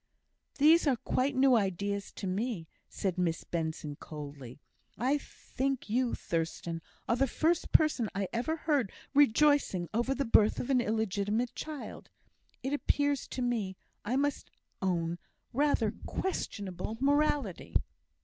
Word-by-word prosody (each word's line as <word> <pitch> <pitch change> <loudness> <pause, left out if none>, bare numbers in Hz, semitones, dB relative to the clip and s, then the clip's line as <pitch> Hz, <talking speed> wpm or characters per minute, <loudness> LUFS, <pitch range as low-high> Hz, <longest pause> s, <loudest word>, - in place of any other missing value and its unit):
"These 310 +3 +6
are 270 - +4
quite 260 +4 0
new 260 0 +5
ideas 200 -1 -1
to - - -6
me," 190 -2 -2 0.2
said 185 -2 -2
Miss 170 -2 0
Benson, 160 -3 -3
coldly. 145 -4 -9 0.4
"I 265 +5 +2
think 270 -4 -4
you, 245 +1 +2
Thurstan, 165 0 -3 0.3
are 230 - +3
the 270 +2 +2
first 325 +6 +1
person 285 -8 +4
I 195 -1 0
ever 250 +8 0
heard 290 - 0 0.2
rejoicing 285 - +4
over 240 +4 +1
the 275 - -1
birth 220 -2 +4
of 250 - -2
an 255 -2 +4
illegitimate 220 +1 0
child. 305 -3 -7 0.5
It 270 +2 -1
appears 285 -1 +1
to 255 - -3
me, 215 -6 -1 0.3
I 235 +5 -1
must 285 +1 0 0.3
own, 175 -2 0 0.3
rather 260 -5 +2
questionable 205 - -3
morality." 285 - +1
235 Hz, 130 wpm, -31 LUFS, 190-275 Hz, 0.5 s, These